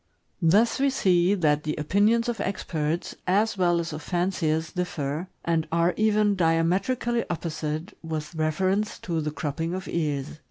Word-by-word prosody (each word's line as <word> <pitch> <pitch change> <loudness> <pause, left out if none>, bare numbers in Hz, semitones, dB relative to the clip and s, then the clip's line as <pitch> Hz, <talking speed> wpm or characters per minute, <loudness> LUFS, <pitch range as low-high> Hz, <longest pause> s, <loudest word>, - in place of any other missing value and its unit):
Thus 205 +10 +4
we 275 +1 +3
see 185 -6 +3
that 150 -5 +2
the 155 - -2
opinions 205 +9 +2
of 240 -2 -2
experts, 165 -4 -2
as 205 +4 +2
well 175 -2 +2
as 165 -1 -3
of 155 - -5
fanciers, 165 -2 -1
differ, 165 -2 -3 0.2
and 165 -2 +1
are 170 +2 +2
even 215 -1 +3
diametrically 190 +8 +1
opposite, 160 +1 -4
with 155 -1 -5
reference 185 +6 0
to 165 -3 -2
the 150 - -2
cropping 160 +3 -3
of 190 0 -6
ears. 150 -2 -2
170 Hz, 150 wpm, -26 LUFS, 155-195 Hz, 0.2 s, Thus